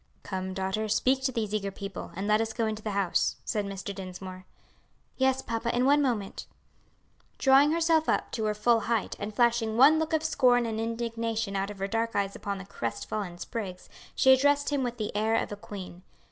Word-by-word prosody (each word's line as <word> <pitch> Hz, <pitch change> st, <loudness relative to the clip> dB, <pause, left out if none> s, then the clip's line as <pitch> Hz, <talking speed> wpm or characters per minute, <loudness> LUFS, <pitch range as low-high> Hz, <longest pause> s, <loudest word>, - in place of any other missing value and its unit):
"Come, 190 Hz, -1 st, -4 dB
daughter, 190 Hz, +3 st, -2 dB
speak 255 Hz, +5 st, +2 dB
to 265 Hz, -, +2 dB
these 220 Hz, -4 st, -2 dB
eager 200 Hz, -2 st, -1 dB
people, 195 Hz, 0 st, -7 dB
and 195 Hz, +3 st, -3 dB
let 215 Hz, +1 st, +4 dB
us 225 Hz, 0 st, -2 dB
go 230 Hz, -, 0 dB
into 215 Hz, 0 st, -3 dB
the 215 Hz, -, -4 dB
house," 190 Hz, -3 st, +1 dB
said 210 Hz, -3 st, -1 dB
Mr. 195 Hz, 0 st, -5 dB
Dinsmore. 185 Hz, -1 st, -8 dB, 0.7 s
"Yes, 265 Hz, 0 st, +1 dB
papa, 235 Hz, +1 st, -2 dB
in 250 Hz, +1 st, +2 dB
one 290 Hz, +2 st, +5 dB
moment." 230 Hz, -8 st, -2 dB, 0.9 s
Drawing 275 Hz, +2 st, +5 dB
herself 325 Hz, -1 st, +2 dB
up -, -, 0 dB
to 220 Hz, -3 st, -2 dB
her 210 Hz, 0 st, 0 dB
full 230 Hz, +2 st, +3 dB
height, 225 Hz, 0 st, -1 dB
and 205 Hz, +1 st, -4 dB
flashing 230 Hz, 0 st, +2 dB
one 290 Hz, +5 st, +7 dB
look 320 Hz, 0 st, -2 dB
of 315 Hz, 0 st, +2 dB
scorn 250 Hz, -6 st, +3 dB
and 220 Hz, -1 st, -3 dB
indignation 230 Hz, -2 st, -2 dB
out 195 Hz, +1 st, -1 dB
of 205 Hz, -, -8 dB
her 195 Hz, 0 st, -2 dB
dark 230 Hz, +2 st, -1 dB
eyes 200 Hz, -1 st, 0 dB
upon 200 Hz, -1 st, -4 dB
the 190 Hz, -, -8 dB
crest 115 Hz, -11 st, -5 dB
fallen 195 Hz, -5 st, -4 dB
Spriggs, 190 Hz, -3 st, -6 dB, 0.3 s
she 265 Hz, -, +6 dB
addressed 285 Hz, +2 st, +3 dB
him 285 Hz, -2 st, +1 dB
with 245 Hz, -1 st, -2 dB
the 215 Hz, -2 st, -4 dB
air 220 Hz, +2 st, +2 dB
of -, -, -1 dB
a -, -, -3 dB
queen. 200 Hz, -4 st, -9 dB
220 Hz, 205 wpm, -28 LUFS, 200-245 Hz, 0.9 s, one